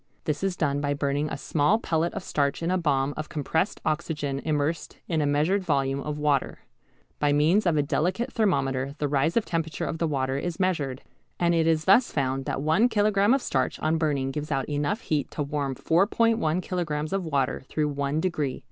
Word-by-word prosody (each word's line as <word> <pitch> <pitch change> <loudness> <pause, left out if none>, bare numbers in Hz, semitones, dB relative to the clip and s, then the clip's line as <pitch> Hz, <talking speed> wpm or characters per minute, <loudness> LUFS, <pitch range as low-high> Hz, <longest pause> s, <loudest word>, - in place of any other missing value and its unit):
This 150 +3 -2
is 195 -2 0
done 145 -2 0
by 145 0 0
burning 145 +1 -1
a - - -4
small 150 +8 +2
pellet 170 -5 0
of - - -4
starch 140 0 -1
in 170 - 0
a 185 - +2
bomb 140 -4 +1
of 155 - -5
compressed 160 +5 -1
oxygen 150 -3 -1
immersed 155 +1 -1
in 160 -3 0
a 145 - +1
measured 155 +8 +2
volume 140 -4 0
of 150 +1 -4
water. 145 -2 0 0.6
By 145 -1 +2
means 165 +8 +3
of 165 -3 +2
a 145 - +3
delicate 180 +11 -1
thermometer 140 - 0
the 150 - -1
rise 145 +7 +1
of 230 - +2
temperature 165 -2 -2
of 165 - -4
the 165 - +1
water 135 -2 -1
is 175 +4 -4
measured, 150 -9 -1 0.4
and 175 0 +3
it 165 -1 +2
is 160 -1 +2
thus 220 +6 +5
found 135 -2 -1
that 135 - -2
one 185 +11 +3
kilogram 205 -1 +3
of 275 - -2
starch 130 -2 0
on 160 +1 +1
burning 140 -4 0
gives 150 +2 -5
out 135 -2 0
enough 150 +8 -1
heat 150 -3 -1
to 150 - -3
warm 140 -2 -2
4·1 190 - +2
kilograms 160 -3 -2
of 195 -1 0
water 140 -5 -1
through 150 -1 0
one 140 +1 -1
degree. 155 -6 -1
155 Hz, 200 wpm, -26 LUFS, 140-175 Hz, 0.6 s, thus